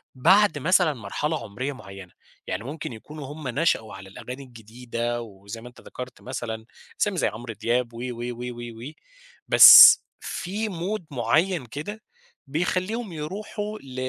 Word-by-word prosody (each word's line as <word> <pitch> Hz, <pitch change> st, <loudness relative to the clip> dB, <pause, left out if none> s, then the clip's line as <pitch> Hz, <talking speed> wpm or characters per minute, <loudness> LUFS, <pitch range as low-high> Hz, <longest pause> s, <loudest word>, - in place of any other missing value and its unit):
بعد 190 Hz, +5 st, +4 dB
مثلًا 175 Hz, 0 st, +3 dB
مرحلة 145 Hz, +7 st, -3 dB
عمرية 130 Hz, +8 st, -5 dB
معيّنة، 95 Hz, -6 st, -12 dB, 0.4 s
يعني 95 Hz, +3 st, -4 dB
ممكن 140 Hz, -1 st, -6 dB
يكونوا 150 Hz, +6 st, -10 dB
هم 155 Hz, -3 st, -8 dB
نشأوا 125 Hz, -6 st, 0 dB
على 95 Hz, 0 st, -11 dB
الأغاني 125 Hz, +7 st, -9 dB
الجديدة 120 Hz, 0 st, -5 dB
وزيّ 100 Hz, +1 st, -10 dB
ما 125 Hz, -, -10 dB
ذكرت 125 Hz, -1 st, -9 dB
مثلًا 115 Hz, -3 st, -6 dB, 0.4 s
أسامي 205 Hz, -3 st, +1 dB
زيّ -, -, +2 dB
عمرو 115 Hz, +1 st, -6 dB
دياب 120 Hz, +3 st, -1 dB
و -, -, -10 dB
و 120 Hz, 0 st, -8 dB
و 125 Hz, +1 st, -6 dB
و 120 Hz, +3 st, -9 dB, 0.6 s
وبس -, -, +11 dB, 0.2 s
في 210 Hz, +4 st, -4 dB
مود 180 Hz, +1 st, -4 dB
معين 140 Hz, +6 st, +1 dB
كده 155 Hz, -, -7 dB, 0.5 s
بيخلّيهم 185 Hz, -, -2 dB
يروحوا 205 Hz, +7 st, -6 dB
ل 130 Hz, -2 st, -12 dB
130 Hz, 140 wpm, -24 LUFS, 115-170 Hz, 0.6 s, وبس